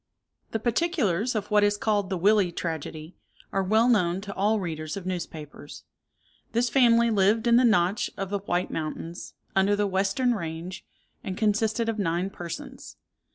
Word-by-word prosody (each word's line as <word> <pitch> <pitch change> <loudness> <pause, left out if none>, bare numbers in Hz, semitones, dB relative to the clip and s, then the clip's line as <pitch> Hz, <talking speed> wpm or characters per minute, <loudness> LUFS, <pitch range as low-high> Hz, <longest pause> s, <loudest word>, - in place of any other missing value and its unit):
The - - -1
particulars 240 - 0
of 210 0 -3
what 210 0 +5
is 205 0 +2
called 205 -3 0
the 190 - -1
Willey 200 0 +3
Tragedy 160 -1 -5 0.4
are 195 - +1
well 220 +5 +3
known 185 -7 +2
to 200 0 -7
all 210 +3 +1
readers 155 -2 -4
of 190 - -7
newspapers. 155 -5 -7 0.7
This 235 +1 +1
family 235 -3 +4
lived 210 +2 +3
in 235 0 +5
the 255 - +5
Notch 205 -3 +2
of 195 -1 -4
the 200 - 0
White 180 -2 -2
Mountains, 165 +2 -5 0.2
under 195 +1 +3
the 205 0 +1
western 195 +6 +1
range, 170 -2 -5 0.4
and 185 - -5
consisted 220 +1 +1
of 225 -1 -2
nine 180 +1 -1
persons. 175 -3 -8
200 Hz, 160 wpm, -26 LUFS, 175-220 Hz, 0.7 s, what